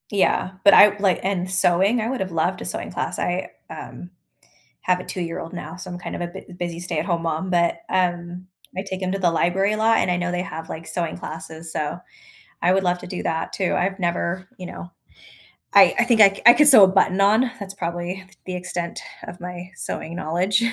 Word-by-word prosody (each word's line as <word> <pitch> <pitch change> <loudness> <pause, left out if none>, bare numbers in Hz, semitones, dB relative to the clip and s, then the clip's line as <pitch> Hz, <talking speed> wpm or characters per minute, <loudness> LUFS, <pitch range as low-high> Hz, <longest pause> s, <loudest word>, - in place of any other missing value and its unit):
Yeah, 195 -2 +1
but 200 - +7
I 205 0 +7
like, 195 -3 +2
and 185 -2 -1
sewing, 190 +5 +2
I 220 - -2
would 260 -1 -3
have 190 -1 -3
loved 170 +3 -1
a - - -6
sewing - - -5
class. - - -3
I, 180 +1 -2 0.2
um, 175 - -9 0.7
have 180 0 +1
a - - -7
2 185 - -6
year-old 165 -1 -5
now, 175 -2 -7
so 185 0 -9
I'm 175 - -6
kind 175 - -6
of - - -7
a - - -1
bu 185 +1 -11
busy 175 -1 -5
stay 175 -2 -3
at 155 - -1
home 170 -2 -1
mom, 165 +3 -2
but, 170 - +1
um, 175 -1 -1 0.3
I 190 - -2
take 190 -1 -6
him 185 0 -1
to 195 - -1
the 180 -3 +2
library 180 +5 +1
a - - -1
lot, 225 +1 +3
and - - +1
I 180 - +1
know 175 0 -2
they 180 0 -1
have, 160 -3 -7
like, 165 -1 -7
sewing 165 0 -3
classes, 160 +1 -8
so 150 +2 -3 0.6
I 180 +2 +3
would 190 0 +2
love 180 0 +1
to - - -9
do 180 0 -5
that 160 -1 -2
too. 190 -2 0
I've 190 +2 -1
never, 175 +1 -2
you 180 - -6
know 175 - -9 0.8
I - - +7
I 240 - +4
think 235 -3 +4
I 195 -1 +6
I 240 - +11
could 300 +2 +5
sew 250 -8 +9
a - - +2
button 190 0 +2
on, 220 +5 +3
that's 200 -2 -7
probably 175 0 -4 0.2
the 185 - -4
extent 175 -1 -4 0.2
of 175 - -9
my 180 0 -7
sewing 170 -1 -5
knowledge. 185 +5 0
180 Hz, 230 wpm, -22 LUFS, 175-195 Hz, 0.8 s, I